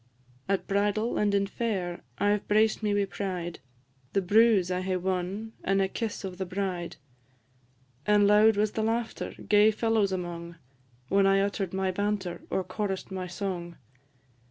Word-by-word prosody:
At 195 -1 +1
bridal 205 +3 0
and 205 -1 +2
in 200 0 +2
fair 195 -5 -3 0.2
I 205 +5 +3
've 210 - -7
braced 215 +1 +3
me 210 -1 0
wi' 205 0 +2
pride, 185 -3 -4 0.5
The 195 - +2
bruse 205 -2 +4
I 180 0 0
hae 185 0 -1
won, 190 +4 -3
and 195 0 +2
a 195 - +2
kiss 220 +2 -4
of 185 -1 -6
the 190 - -1
bride; 180 -2 -3 1.1
And 210 -1 +5
loud 210 +1 +5
was 210 0 +2
the 220 - -2
laughter, 225 +1 -2
gay 210 +1 +6
fellows 220 -2 +1
among, 170 -2 -5 0.5
When 195 0 +4
I 195 0 +4
utter'd 195 -2 -1
my 190 0 0
banter, 195 -2 -2
or 190 - 0
chorus'd 190 +1 -4
my 185 -1 -4
song. 175 -2 -4
195 Hz, 160 wpm, -28 LUFS, 185-210 Hz, 1.1 s, gay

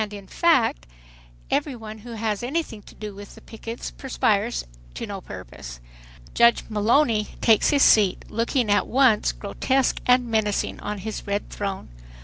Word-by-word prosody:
In 200 -1 -9
fact 260 - +2 0.6
every 280 - 0
one 220 -2 -9
who 235 +2 -9
has 220 -2 -2
anything 250 -4 -3
to - - -16
do 210 -1 -7
with 200 +1 -11
the - - -14
pickets 225 +1 -7
perspires 230 -4 0 0.3
to - - -4
no - - -6
purpose. - - -10 0.5
Judge 235 0 +4
Mullowny 215 +1 +1
takes 220 -3 +4
his 285 -2 +4
seat, 200 -4 +4
looking 230 0 0
at 205 - +2
once 250 -5 +3
grotesque 260 +6 0
and 250 0 +5
menacing 220 -3 -1
on 210 0 -4
his 215 +2 -6
red 200 +1 -2
throne. 195 -2 -4
220 Hz, 150 wpm, -24 LUFS, 205-245 Hz, 0.6 s, and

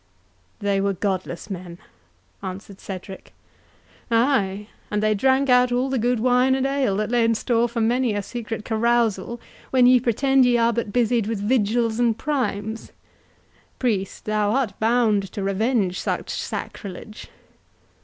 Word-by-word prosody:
"They 200 -1 0
were 200 0 +1
godless 190 0 -3
men," 175 -2 -7 0.6
answered 190 +1 -8
Cedric. 190 0 -8 0.8
"Ay, 225 -5 +1 0.2
and 210 0 -1
they 215 0 +3
drank 265 +6 +2
out 250 -1 +4
all 255 +2 0
the 265 - 0
good 245 +1 +1
wine 250 +2 +3
and 265 0 0
ale 270 -7 0
that 215 +1 -2
lay 240 -1 +3
in 230 0 +2
store 235 +1 +1
for 230 0 -2
many 240 0 +1
a 205 - -2
secret 225 0 -6
carousal, 235 -1 0 0.3
when 255 -2 +4
ye 250 0 +6
pretend 260 +3 +2
ye 245 -1 +4
are 235 0 +3
but 230 -3 -2
busied 235 -1 +1
with 225 -2 -2
vigils 225 +1 +1
and 235 -2 +2
primes!—Priest, 220 -3 -5
thou 215 -1 +1
art 255 -6 0
bound 220 -4 +2
to 205 - -4
revenge 195 -1 0
such - - -3
sacrilege." 205 +2 -6
225 Hz, 145 wpm, -23 LUFS, 205-245 Hz, 0.8 s, ye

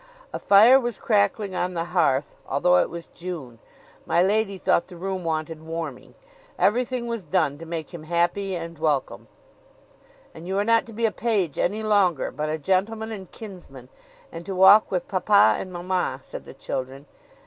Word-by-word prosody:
A - - -3
fire 225 +7 +7
was 240 -4 -3
crackling 200 -2 +1
on 180 0 -2
the 165 - -1
hearth, 145 -5 +1
although 180 +6 +3
it - - +2
was 170 0 -8
June. 155 -10 -8 0.5
My 175 - +3
lady 200 0 +1
thought 170 - +1
the 180 - -12
room 190 +1 -4
wanted 160 -1 -3
warming; 160 -4 -7 0.4
everything 245 +2 +1
was 230 -3 -4
done 155 -4 0
to 165 - -9
make 165 +1 -6
him 160 -2 -9
happy 175 +4 0
and 165 -2 -7
welcome: 150 -4 -1 1.1
"And 160 +2 -11
you 190 +1 -2
are 200 - +2
not 230 +1 +2
to 230 - -11
be 230 +2 -1
a 220 - +2
page 205 - -1
any 215 +4 0
longer, 200 -7 +2
but 150 +3 -3
a 155 - -1
gentleman 205 +7 -1
and 195 -4 -8
kinsman, 175 - -11 0.4
and 165 +1 -8
to 195 - -4
walk 190 +3 +7
with 180 -2 -2
papa 200 +2 +4
and 185 - -6
mamma," 175 -6 -2
said - - -9
the - - -12
children. 135 +2 -5
180 Hz, 180 wpm, -24 LUFS, 160-205 Hz, 1.1 s, fire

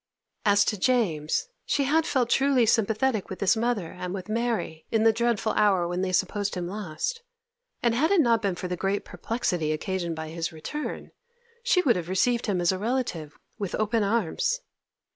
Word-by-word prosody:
As 200 -1 +5
to 210 - -1
James, 180 - +1 0.2
she 285 - +1
had 315 +4 +2
felt 245 -4 +1
truly 270 -3 +4
sympathetic 220 +1 +1
with 190 - -6
his 200 +3 +3
mother 225 -6 -1
and 180 +1 -5
with 190 +1 -7
Mary 225 -8 -2
in 225 -1 +2
the 225 0 +5
dreadful 230 -1 +1
hour 195 -5 +3
when 175 +1 -2
they 190 -1 -1
supposed 205 +2 0
him 175 -1 -3
lost, 205 - -4 0.6
and 235 -1 +3
had 290 +8 +2
it 400 - +4
not 235 -6 +4
been 195 -3 0
for 180 - -5
the 180 - -2
great 195 +3 -1
perplexity 180 -9 -2
occasioned 170 +1 -2
by 160 0 -6
his 165 0 -3
return 170 - -6 0.5
she 395 -7 +3
would 240 -9 +3
have 175 -1 -5
received 235 +6 +1
him 195 -3 +1
as 175 0 +3
a 185 - -3
relative 210 - -2 0.2
with 200 -3 -3
open 215 +1 +1
arms. 235 - 0
210 Hz, 185 wpm, -26 LUFS, 180-240 Hz, 0.6 s, As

